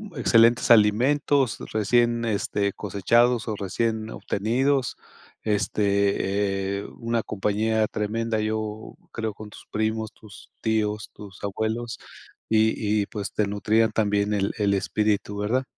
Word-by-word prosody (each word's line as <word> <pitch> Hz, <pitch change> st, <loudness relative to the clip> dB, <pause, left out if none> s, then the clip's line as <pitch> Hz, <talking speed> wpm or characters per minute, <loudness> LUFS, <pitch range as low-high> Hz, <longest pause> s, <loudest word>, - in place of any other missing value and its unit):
excelentes 120 Hz, -2 st, +4 dB
alimentos 125 Hz, +4 st, +3 dB
recién, 115 Hz, +2 st, +2 dB
este, 100 Hz, -2 st, -1 dB
cosechados 115 Hz, +4 st, +2 dB
o 110 Hz, -, -2 dB
recién 110 Hz, +3 st, -2 dB
obtenidos, 125 Hz, +5 st, 0 dB, 0.5 s
este, 100 Hz, -1 st, 0 dB
eh, -, -, -7 dB
una 115 Hz, -1 st, -1 dB
compañía 110 Hz, +2 st, 0 dB
tremenda, 110 Hz, +1 st, -2 dB
yo 110 Hz, 0 st, -3 dB, 0.2 s
creo 110 Hz, -2 st, -4 dB
con 105 Hz, -1 st, -10 dB
tus -, -, -14 dB
primos, 110 Hz, 0 st, -1 dB
tus 105 Hz, -3 st, -15 dB
tíos, 105 Hz, -1 st, -1 dB
tus 100 Hz, -3 st, -12 dB
abuelos, 110 Hz, +3 st, -3 dB, 0.5 s
y 110 Hz, -1 st, +2 dB
y 100 Hz, -, -1 dB
pues 105 Hz, -4 st, -5 dB
te 105 Hz, -, 0 dB
nutrían 110 Hz, +2 st, +1 dB
también 105 Hz, -1 st, +1 dB
el 100 Hz, -1 st, 0 dB
el 100 Hz, -2 st, +2 dB
espíritu 105 Hz, 0 st, 0 dB
¿verdad? 120 Hz, +6 st, 0 dB
110 Hz, 120 wpm, -25 LUFS, 100-115 Hz, 0.5 s, excelentes